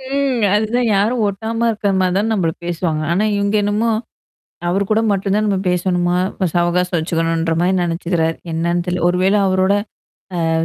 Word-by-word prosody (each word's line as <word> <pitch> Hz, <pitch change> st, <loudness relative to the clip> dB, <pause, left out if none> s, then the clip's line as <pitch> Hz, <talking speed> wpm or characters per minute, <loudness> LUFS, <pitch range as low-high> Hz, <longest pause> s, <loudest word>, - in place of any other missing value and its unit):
ம். 270 Hz, -5 st, 0 dB
அதுதான் 220 Hz, +4 st, +1 dB
யாரும் 220 Hz, +5 st, +1 dB
ஒட்டாம 225 Hz, +4 st, -2 dB
இருக்கற 210 Hz, -2 st, -1 dB
மாரி 185 Hz, -1 st, +1 dB
தான் 220 Hz, +2 st, 0 dB
நம்பள 175 Hz, -6 st, +1 dB
பேசுவாங்க. 165 Hz, -2 st, -2 dB
ஆனா 185 Hz, +5 st, +1 dB
இவுங்க 200 Hz, +1 st, 0 dB
என்னமோ 210 Hz, +3 st, +1 dB, 0.8 s
அவர் 190 Hz, +3 st, +1 dB
கூட 215 Hz, +1 st, +3 dB
மட்டும் 195 Hz, 0 st, 0 dB
தான் 215 Hz, +1 st, +1 dB
நம்ம 195 Hz, -2 st, +1 dB
பேசணுமாம். 180 Hz, 0 st, +1 dB, 0.3 s
சவகாசம் 175 Hz, +1 st, +1 dB
வச்சுக்கணுன்ற 165 Hz, 0 st, -1 dB
மாரி 180 Hz, +2 st, +2 dB
நெனச்சுக்கிறாரு. 170 Hz, -1 st, -1 dB, 0.2 s
என்னான்னு 170 Hz, +2 st, -1 dB
தெரில! 180 Hz, -1 st, -2 dB
ஒரு 175 Hz, -, +1 dB
வேள 190 Hz, +2 st, +3 dB
அவரோட 190 Hz, +1 st, +2 dB, 0.8 s
அ -, -, +1 dB
185 Hz, 160 wpm, -18 LUFS, 175-210 Hz, 0.8 s, கூட